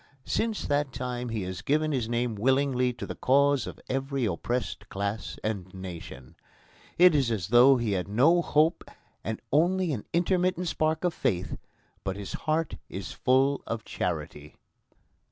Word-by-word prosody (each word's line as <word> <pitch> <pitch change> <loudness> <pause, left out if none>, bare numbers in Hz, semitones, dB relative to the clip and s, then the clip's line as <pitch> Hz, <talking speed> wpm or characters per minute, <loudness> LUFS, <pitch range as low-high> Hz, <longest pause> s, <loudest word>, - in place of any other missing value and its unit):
Since 225 -2 -1
that 145 -1 0
time 125 0 -4
he 110 -3 -2
has 90 -1 -5
given 155 +2 +1
his 125 -5 -1
name 120 0 0
willingly 125 +3 +2
to - - -6
the - - -5
cause 140 +1 +3
of - - -8
every 135 0 -1
oppressed 120 +6 -3
class 100 +2 -3
and 100 -4 -3
nation. 85 -8 -9 0.6
It 180 -1 +7
is 135 -5 +2
as 105 -6 -2
though 125 +3 +7
he 115 -3 -1
had 95 -2 -1
no 140 +12 +4
hope 155 +1 +2 0.4
and 110 -1 -3
only 175 +3 +2
an 110 - -5
intermittent 180 +1 +1
spark 155 +1 0
of 175 -2 +1
faith; 90 - -1 0.5
but 95 -1 -2
his 100 -1 -6
heart 160 +1 -1
is 95 -2 -6
full 135 +2 +2
of 115 -1 -4
charity. 75 -3 -4
125 Hz, 155 wpm, -28 LUFS, 105-150 Hz, 0.6 s, It